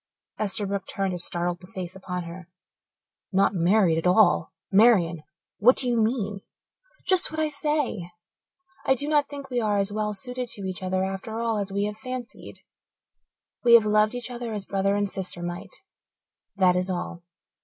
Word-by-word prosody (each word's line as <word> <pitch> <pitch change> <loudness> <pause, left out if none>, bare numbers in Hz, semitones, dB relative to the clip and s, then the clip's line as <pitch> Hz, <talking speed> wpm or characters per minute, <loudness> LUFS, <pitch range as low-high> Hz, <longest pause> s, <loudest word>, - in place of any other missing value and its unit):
Esterbrook 200 -1 -1
turned 195 -1 -2
a 175 - -4
startled 175 0 -1
face 185 -4 -6
upon 180 -1 -5
her. 170 +1 -10 0.8
"Not 195 0 +3
married 175 -1 +3
at 165 - -1
all! 205 +4 +4 0.2
Marian, 190 -6 +4 0.4
what 245 +5 +6
do 255 - +2
you 240 - +1
mean?" 215 -3 0 0.6
"Just 370 -1 +5
what 315 - -5
I 310 -1 +1
say. 295 - -2 0.7
I 265 - +3
do 285 +3 -1
not 295 -1 +2
think 280 -2 -8
we 245 -1 0
are 210 -2 +1
as 200 0 +1
well 210 0 -2
suited 250 +4 -5
to 200 - -8
each 185 0 -5
other 185 0 0
after 195 +3 -4
all 230 -2 0
as 200 -1 -3
we 200 +1 0
have 210 0 -4
fancied. 255 +1 -7 1.0
We 235 -1 +8
have 225 -2 +6
loved 215 +2 +3
each 245 0 -5
other 240 -2 -5
as 205 -2 -2
brother 195 0 0
and 205 0 +1
sister 185 -3 -4
might 175 - -6 0.7
that 185 -2 +4
is 180 +1 +3
all. 180 -1 -4
205 Hz, 175 wpm, -25 LUFS, 185-235 Hz, 1.0 s, We